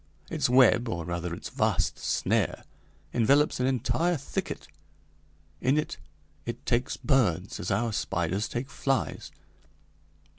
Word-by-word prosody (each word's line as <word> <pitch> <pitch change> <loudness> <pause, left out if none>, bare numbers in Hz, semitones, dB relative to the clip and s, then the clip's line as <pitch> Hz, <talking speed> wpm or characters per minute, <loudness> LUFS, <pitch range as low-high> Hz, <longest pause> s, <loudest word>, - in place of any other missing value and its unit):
Its 140 -5 +1
web, 125 -2 +5
or 85 -7 -3
rather 85 0 -3
its 85 - -6
vast - - 0
snare, - - 0 0.5
envelops 140 +6 +3
an 125 - +2
entire 160 +7 +1
thicket. 140 - -4 0.9
In 130 +4 +3
it 150 - -1 0.5
it - - -6
takes 120 +2 0
birds 100 - +1
as 90 - -3
our 110 +3 0
spiders 95 +2 -1
take 125 +3 -4
flies. 135 -7 -1
120 Hz, 120 wpm, -28 LUFS, 95-135 Hz, 0.9 s, web